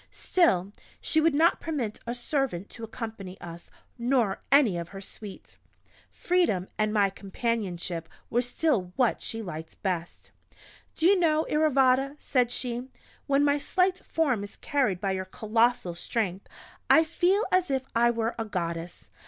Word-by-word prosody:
Still 200 Hz, -, +2 dB, 0.3 s
she 315 Hz, -, +2 dB
would 320 Hz, -2 st, +3 dB
not 330 Hz, +3 st, +4 dB
permit 265 Hz, -10 st, -3 dB
a 235 Hz, -, -2 dB
servant 245 Hz, -, -2 dB
to 230 Hz, -, -9 dB
accompany 220 Hz, -5 st, -7 dB
us, 170 Hz, 0 st, -10 dB, 0.3 s
nor 235 Hz, -5 st, +1 dB
any 275 Hz, -9 st, +5 dB
of 170 Hz, -1 st, -4 dB
her 195 Hz, -, -8 dB
suite. 195 Hz, +1 st, -10 dB, 0.5 s
Freedom, 340 Hz, -, +1 dB
and 215 Hz, 0 st, +1 dB
my 200 Hz, -2 st, +3 dB
companionship 190 Hz, -5 st, -3 dB, 0.2 s
were 240 Hz, -, +3 dB
still 245 Hz, -, 0 dB
what 250 Hz, -3 st, +2 dB
she 225 Hz, 0 st, -4 dB
liked 160 Hz, -4 st, -8 dB
best. 180 Hz, -3 st, -3 dB, 0.6 s
"Do 325 Hz, -, 0 dB
you 385 Hz, +1 st, +6 dB
know, 315 Hz, -2 st, +3 dB
Iravata," 275 Hz, -2 st, +3 dB
said 250 Hz, -4 st, +1 dB
she, 245 Hz, +1 st, -3 dB, 0.4 s
"when 280 Hz, 0 st, +3 dB
my 285 Hz, 0 st, +3 dB
slight 365 Hz, +4 st, +1 dB
form 275 Hz, -10 st, 0 dB
is 205 Hz, -, -9 dB
carried 260 Hz, -, 0 dB
by 195 Hz, 0 st, -1 dB
your 185 Hz, 0 st, -2 dB
colossal 225 Hz, 0 st, +1 dB
strength, 190 Hz, +1 st, -2 dB, 0.4 s
I 320 Hz, -, +7 dB
feel 355 Hz, +6 st, +2 dB
as 370 Hz, -1 st, +2 dB
if 265 Hz, -1 st, 0 dB
I 235 Hz, 0 st, +4 dB
were 230 Hz, 0 st, -1 dB
a 225 Hz, -, -1 dB
Goddess! 170 Hz, -4 st, -5 dB
235 Hz, 155 wpm, -27 LUFS, 195-285 Hz, 0.6 s, I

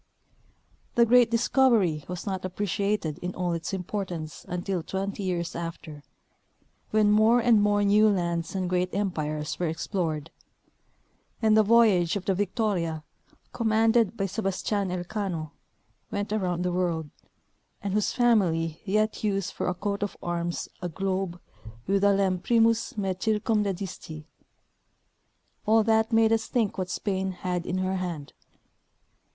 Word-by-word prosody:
The 235 Hz, -, +6 dB
great 240 Hz, 0 st, +5 dB
discovery 230 Hz, -, +2 dB
was 180 Hz, -1 st, -6 dB
not 190 Hz, -2 st, -3 dB
appreciated 200 Hz, -3 st, -2 dB
in 180 Hz, 0 st, -5 dB
all 175 Hz, -1 st, -1 dB
its 165 Hz, -1 st, -4 dB
InqDortance 180 Hz, -4 st, -5 dB
until 180 Hz, +1 st, -3 dB
twenty 195 Hz, +4 st, -4 dB
years 175 Hz, -3 st, -2 dB
after, 165 Hz, -3 st, -6 dB, 0.9 s
when 215 Hz, -1 st, +3 dB
more 220 Hz, +3 st, +5 dB
and 230 Hz, -3 st, +4 dB
more 205 Hz, 0 st, +2 dB
new 210 Hz, +2 st, +5 dB
lands 170 Hz, -3 st, -1 dB
and 185 Hz, -1 st, -1 dB
great 180 Hz, +1 st, -1 dB
empires 155 Hz, -7 st, -2 dB
were 175 Hz, -, 0 dB
explored; 160 Hz, -2 st, -3 dB, 1.1 s
and 220 Hz, -2 st, +4 dB
the 220 Hz, -, +7 dB
voyage 210 Hz, -6 st, +4 dB
of 200 Hz, -, -4 dB
the 195 Hz, -, +2 dB
Victoria, 185 Hz, -5 st, -1 dB, 0.5 s
com 230 Hz, -, -2 dB
manded 225 Hz, 0 st, +3 dB
by 195 Hz, -, 0 dB
Sebastian 195 Hz, 0 st, -1 dB
Elcano, 180 Hz, -3 st, -3 dB, 0.6 s
went 205 Hz, +1 st, -3 dB
around 180 Hz, -4 st, -1 dB
the 180 Hz, -, 0 dB
world, 170 Hz, -4 st, -1 dB, 0.7 s
and 200 Hz, -1 st, -2 dB
whose 210 Hz, 0 st, +1 dB
family 170 Hz, -10 st, +2 dB
yet 215 Hz, +3 st, 0 dB
use 195 Hz, -3 st, 0 dB
for -, -, -3 dB
a 180 Hz, -, 0 dB
coat 200 Hz, +2 st, -3 dB
of 205 Hz, -, -3 dB
arms 175 Hz, 0 st, -2 dB
a 180 Hz, -, -3 dB
globe 190 Hz, 0 st, -2 dB, 0.5 s
with 195 Hz, +1 st, +1 dB
the 200 Hz, 0 st, +5 dB
lem 195 Hz, -2 st, +1 dB
primus 230 Hz, +2 st, +2 dB
me 195 Hz, -2 st, -1 dB
circumdedisti; 195 Hz, -6 st, -2 dB, 1.4 s
all 220 Hz, +1 st, +5 dB
that 220 Hz, +1 st, +2 dB
made 225 Hz, 0 st, +4 dB
us 220 Hz, -1 st, 0 dB
think 225 Hz, -6 st, 0 dB
what 185 Hz, -1 st, -2 dB
Spain 190 Hz, -1 st, -2 dB
had 180 Hz, -1 st, -3 dB
in 180 Hz, -, -1 dB
her 185 Hz, 0 st, -1 dB
hand. 170 Hz, -6 st, -5 dB
195 Hz, 140 wpm, -27 LUFS, 175-215 Hz, 1.4 s, the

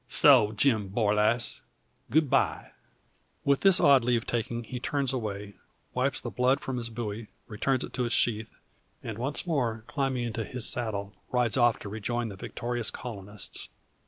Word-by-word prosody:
So, 125 Hz, -7 st, +6 dB
Jim 110 Hz, -3 st, +2 dB
Borlasse, 105 Hz, +2 st, +1 dB, 0.5 s
good 155 Hz, +1 st, +3 dB
bye!" -, -, +1 dB, 0.7 s
With 140 Hz, -1 st, +3 dB
this 195 Hz, -2 st, +7 dB
odd 140 Hz, -3 st, +6 dB
leave 120 Hz, -1 st, +1 dB
taking, 120 Hz, 0 st, -2 dB
he 125 Hz, +2 st, -6 dB
turns 135 Hz, +1 st, -1 dB
away, 105 Hz, -4 st, -4 dB, 0.4 s
wipes 130 Hz, +1 st, +1 dB
the -, -, -6 dB
blood 130 Hz, +2 st, +2 dB
from 130 Hz, -2 st, -4 dB
his 115 Hz, -1 st, -3 dB
bowie, 110 Hz, -1 st, -5 dB, 0.2 s
returns 130 Hz, +5 st, 0 dB
it -, -, -8 dB
to 125 Hz, -, 0 dB
its 120 Hz, -, +1 dB
sheath, 110 Hz, -2 st, +1 dB, 0.5 s
and 115 Hz, -1 st, -5 dB
once 135 Hz, +7 st, -3 dB
more 120 Hz, -9 st, -1 dB
climbing 135 Hz, -3 st, -1 dB
into 115 Hz, -1 st, -3 dB
his 125 Hz, +2 st, -3 dB
saddle, 105 Hz, -4 st, -3 dB, 0.2 s
rides 125 Hz, -3 st, +2 dB
off 120 Hz, -2 st, +4 dB
to 100 Hz, -, -6 dB
rejoin 115 Hz, +3 st, -2 dB
the 100 Hz, -, -8 dB
victorious 120 Hz, +3 st, -3 dB
colonists. 105 Hz, -4 st, -7 dB
120 Hz, 160 wpm, -28 LUFS, 110-130 Hz, 0.7 s, this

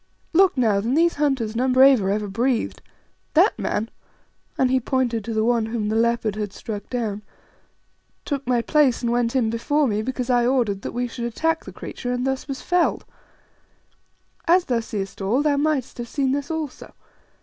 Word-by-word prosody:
Look 370 Hz, -3 st, +4 dB
now, 220 Hz, -5 st, +3 dB
than 235 Hz, +6 st, 0 dB
these 335 Hz, 0 st, +3 dB
hunters 260 Hz, -7 st, 0 dB
none 255 Hz, +2 st, +1 dB
braver 260 Hz, -6 st, +6 dB
ever 210 Hz, +1 st, -1 dB
breathed. 235 Hz, +4 st, -1 dB, 0.5 s
That 355 Hz, +6 st, +4 dB
man" 220 Hz, +2 st, -2 dB, 0.7 s
and 255 Hz, -1 st, +2 dB
he 260 Hz, -, +3 dB
pointed 245 Hz, -3 st, -1 dB
to 230 Hz, -, -3 dB
the 220 Hz, 0 st, +1 dB
one 235 Hz, -2 st, +2 dB
whom 225 Hz, -2 st, -2 dB
the 220 Hz, -, -1 dB
leopard 230 Hz, -2 st, +1 dB
had 210 Hz, -2 st, -4 dB
struck 205 Hz, -2 st, -7 dB
down 220 Hz, -5 st, -3 dB, 1.0 s
"took 280 Hz, -3 st, -3 dB
my 245 Hz, -2 st, +2 dB
place 285 Hz, -5 st, +2 dB
and 235 Hz, -, +1 dB
went 240 Hz, +1 st, 0 dB
in 230 Hz, -4 st, +2 dB
before 285 Hz, +6 st, +1 dB
me 210 Hz, -2 st, 0 dB
because 255 Hz, +1 st, -2 dB
I 240 Hz, -1 st, +3 dB
ordered 235 Hz, -7 st, +1 dB
that -, -, -6 dB
we 245 Hz, +1 st, -1 dB
should 235 Hz, 0 st, -5 dB
attack 325 Hz, +8 st, -1 dB
the -, -, -8 dB
creature, 245 Hz, -, -6 dB
and 250 Hz, +1 st, -1 dB
thus 265 Hz, +1 st, -2 dB
was 275 Hz, -2 st, -5 dB
felled. 355 Hz, -1 st, +1 dB, 1.4 s
As 350 Hz, +2 st, +4 dB
thou 245 Hz, -3 st, 0 dB
seest 205 Hz, -3 st, -5 dB
all, 230 Hz, +9 st, +1 dB
thou 295 Hz, -2 st, +2 dB
mightest 285 Hz, -4 st, -1 dB
have 240 Hz, -, -4 dB
seen 270 Hz, +1 st, 0 dB
this 285 Hz, +1 st, -2 dB
also. 315 Hz, -4 st, -5 dB
245 Hz, 185 wpm, -23 LUFS, 225-275 Hz, 1.4 s, braver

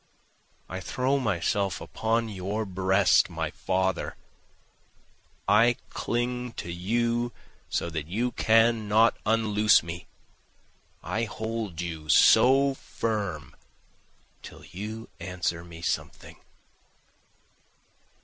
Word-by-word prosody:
I 95 Hz, -, -5 dB
throw 130 Hz, +8 st, 0 dB
myself 100 Hz, -3 st, 0 dB
upon 115 Hz, +1 st, -1 dB
your 105 Hz, +2 st, -3 dB
breast 95 Hz, 0 st, +3 dB
my 80 Hz, -3 st, -3 dB
father, 95 Hz, 0 st, -1 dB, 1.3 s
I 115 Hz, +4 st, +5 dB, 0.2 s
cling 125 Hz, 0 st, -2 dB
to 85 Hz, -, -6 dB
you 120 Hz, +6 st, 0 dB, 0.4 s
so -, -, -1 dB
that 80 Hz, -2 st, -4 dB
you 115 Hz, +8 st, -1 dB
cannot 115 Hz, -1 st, +3 dB
unloose 110 Hz, -3 st, +4 dB
me, 85 Hz, +1 st, -7 dB, 1.0 s
I 115 Hz, +2 st, -1 dB
hold 110 Hz, -5 st, -4 dB
you 80 Hz, -3 st, -6 dB
so 135 Hz, -, +6 dB
firm 100 Hz, -, -4 dB, 0.9 s
till -, -, -12 dB
you 110 Hz, +4 st, -7 dB
answer 85 Hz, -1 st, -3 dB
me 85 Hz, -1 st, -11 dB
something. -, -, -4 dB
105 Hz, 90 wpm, -27 LUFS, 90-115 Hz, 1.3 s, so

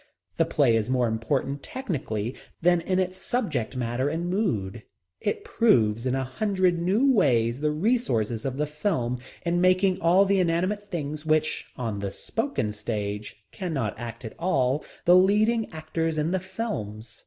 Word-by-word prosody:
The -, -, +3 dB
play 130 Hz, -6 st, +3 dB
is 110 Hz, +1 st, 0 dB
more 125 Hz, -2 st, +2 dB
important, 135 Hz, +5 st, -1 dB
technically, 140 Hz, -, -3 dB, 0.3 s
than 175 Hz, 0 st, +3 dB
in 185 Hz, +2 st, 0 dB
its 185 Hz, 0 st, 0 dB
subject 160 Hz, -, -1 dB
matter 125 Hz, +3 st, -1 dB
and 170 Hz, +3 st, -2 dB
mood. 115 Hz, -, -1 dB, 0.4 s
It 430 Hz, -2 st, -2 dB
proves 125 Hz, -, +2 dB
in 130 Hz, -, +1 dB
a 135 Hz, -, 0 dB
hundred 185 Hz, +5 st, +1 dB
new 215 Hz, +11 st, +3 dB
ways 120 Hz, -, +2 dB
the 150 Hz, +1 st, +1 dB
resources 150 Hz, -, 0 dB
of 135 Hz, -1 st, -3 dB
the 150 Hz, -, +1 dB
film 150 Hz, -, -1 dB, 0.3 s
in 175 Hz, +1 st, +1 dB
making 185 Hz, +1 st, +3 dB
all 180 Hz, +4 st, +5 dB
the 195 Hz, 0 st, +2 dB
inanimate 185 Hz, +4 st, 0 dB
things 155 Hz, -4 st, -4 dB
which, 155 Hz, 0 st, +1 dB
on 110 Hz, -5 st, -3 dB
the 100 Hz, 0 st, -2 dB
spoken 225 Hz, -, -2 dB
stage, 105 Hz, 0 st, -4 dB
cannot 140 Hz, -, -2 dB
act 120 Hz, 0 st, -7 dB
at 110 Hz, -, -6 dB
all, 140 Hz, -5 st, +1 dB, 0.2 s
the 175 Hz, -, +7 dB
leading 215 Hz, +4 st, +3 dB
actors 160 Hz, 0 st, -2 dB
in 155 Hz, +2 st, 0 dB
the 190 Hz, -, +1 dB
films. 115 Hz, -, -5 dB
155 Hz, 160 wpm, -26 LUFS, 120-185 Hz, 0.4 s, the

